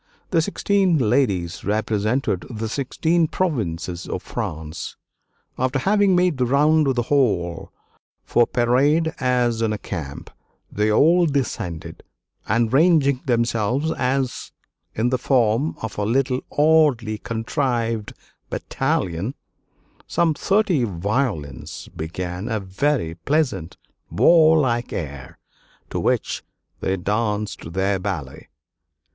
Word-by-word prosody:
The 165 -4 +3
sixteen 195 -1 +1
ladies 105 - +1
represented 110 0 0
the 110 -2 -4
sixteen 160 +7 0
provinces 90 - -2
of - - -4
France. 80 +1 -5 0.6
After 130 +2 +1
having 200 +5 +3
made 180 -6 +2
the 125 - +3
round 150 +3 +3
of 135 - +1
the 120 - +1
hall 100 - 0 0.5
for 120 - +3
parade 145 +7 +2
as 125 -3 +1
in 110 -1 +1
a 105 - -1
camp, 80 -9 -7 0.4
they 105 +1 +1
all 170 +9 +5
descended, 120 - -3 0.5
and 115 +1 +1
ranging 140 -4 +4
themselves 120 +4 +1 1.0
in 115 +3 +1
the 130 0 0
form 125 +2 +2
of 110 - -5
a - - 0
little 130 +4 +1 0.2
oddly 145 -8 +3
contrived 115 -1 -2 0.4
battalion, 125 - -2 0.7
some 170 -2 +2
thirty 190 - +1
violins 100 - -3
began 90 +4 -5
a 110 -2 0
very 100 - -1
pleasant 95 - -1 0.3
warlike 155 -8 +4
air, 70 -6 -6 0.5
to - - -2
which - - 0 0.4
they 95 0 -1
danced 105 -3 -2
their 95 +1 +1
ballet." 85 -9 -5
120 Hz, 110 wpm, -22 LUFS, 100-145 Hz, 1.0 s, all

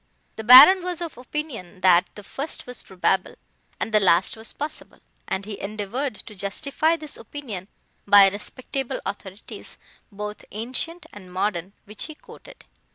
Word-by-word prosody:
The 220 - -6
Baron 260 - +10
was 355 -1 -4
of 340 -2 -5
opinion, 245 - -7
that 180 -1 +5
the 210 - -10
first 280 +9 -5
was 250 0 -7
probable, 190 0 -1 0.4
and 220 - -4
the 215 - +6
last 185 -2 +3
was 220 +1 -7
possible, 300 +1 -7 0.3
and 190 +1 -3
he 210 -1 -7
endeavoured 215 +6 -4
to 210 - -9
justify 275 - 0
this 305 -2 -7
opinion 220 -11 -8 0.4
by 200 -1 +8
respectable 250 +6 -4
authorities, 200 0 -8 0.3
both 210 +1 -7
ancient 255 - -3
and 185 -3 -12
modern, 185 0 -2
which 210 0 -5
he 310 - -9
quoted. - - -15
215 Hz, 150 wpm, -24 LUFS, 195-280 Hz, 0.4 s, Baron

